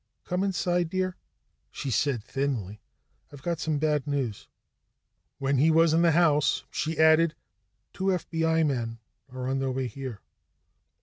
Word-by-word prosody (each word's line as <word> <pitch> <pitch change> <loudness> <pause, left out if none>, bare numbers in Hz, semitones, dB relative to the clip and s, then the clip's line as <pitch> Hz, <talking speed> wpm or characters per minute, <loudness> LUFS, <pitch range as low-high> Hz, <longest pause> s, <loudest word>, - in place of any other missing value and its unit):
"Come 180 +2 -1
inside, 175 -3 0
dear," 185 0 -1 0.5
she 135 - -5
said 125 -3 0
thinly. 120 -7 -3 0.5
"I've 140 -2 -12
got 170 -2 -2
some 155 -2 -1
bad 150 -2 0
news." 135 -8 -2 0.9
When 135 -1 0
he 155 +4 +5
was 160 0 +4
in 165 - +4
the 170 -2 +4
house, 150 -3 +3
she 160 +1 -2
added: 160 0 +5 0.6
"Two 190 - -4
FBI 165 -3 +1
men 120 -5 -2 0.3
are 130 0 -5
on 135 +1 0
their 135 0 -1
way 130 0 -2
here." 130 -4 -6
150 Hz, 145 wpm, -27 LUFS, 135-165 Hz, 0.9 s, he